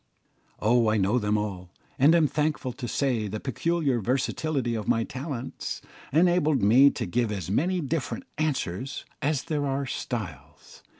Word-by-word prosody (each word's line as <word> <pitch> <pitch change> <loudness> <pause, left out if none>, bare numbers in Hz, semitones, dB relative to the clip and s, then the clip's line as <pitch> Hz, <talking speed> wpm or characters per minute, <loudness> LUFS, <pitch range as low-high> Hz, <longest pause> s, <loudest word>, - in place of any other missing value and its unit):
Oh, 115 +1 +3
I 110 - +2
know 105 +5 +2
them 105 -1 +1
all, 95 -4 -4 0.3
and 145 +5 +6
am 165 -2 +5
thankful 150 -3 -1
to 125 -1 -6
say 120 -4 0
the 105 +2 -4
peculiar 140 +1 0
versatility 130 +2 -1
of 110 -3 -3
my 115 - +2
talents 130 0 -5 0.3
enabled 160 - +3
me 125 +7 +7
to - - -4
give 115 +4 0
as 95 -4 -4
many 175 - +1
different 160 - -3 0.2
answers 135 - -2 0.2
as 145 -2 0
there 150 -3 -1
are 135 +1 -1
styles. 85 - -6
130 Hz, 155 wpm, -27 LUFS, 110-150 Hz, 0.3 s, me